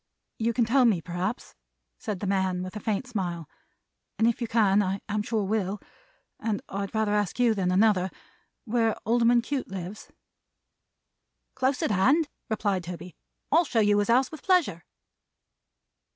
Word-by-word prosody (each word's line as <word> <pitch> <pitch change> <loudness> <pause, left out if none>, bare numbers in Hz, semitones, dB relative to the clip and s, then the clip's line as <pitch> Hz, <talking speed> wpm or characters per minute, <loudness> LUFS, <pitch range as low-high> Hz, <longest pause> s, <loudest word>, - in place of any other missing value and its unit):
"You 230 +1 +1
can 235 0 +1
tell 255 +4 +4
me, 215 -7 +3
perhaps," 180 +7 -4 0.5
said 200 -4 -4
the - - -2
man 190 -2 0
with 185 +2 -7
a - - -4
faint 210 +3 -2
smile, 180 - -4 0.7
"and 225 - +3
if 235 +2 0
you 235 - -1
can 210 -3 +3
I 195 0 -1
am 210 0 -1
sure 215 0 -1
will, 200 0 -1 0.6
and 215 -2 -1
I'd 200 +1 -4
rather 215 -1 +1
ask 210 +1 -1
you 240 -2 +4
than 190 -4 0
another 190 -1 +3 0.6
where 225 -1 +1
Alderman 235 +1 +3
Cute 275 0 -3
lives." 190 +2 -7 1.4
"Close 260 +1 0
at - - +1
hand," 275 - +3 0.2
replied 205 -4 0
Toby, 175 0 -8 0.4
"I'll 330 +4 +5
show 255 -7 0
you 205 -1 +4
his 205 - 0
house 250 +3 +3
with 315 - -9
pleasure." 350 - +1
210 Hz, 160 wpm, -27 LUFS, 190-235 Hz, 1.4 s, I'll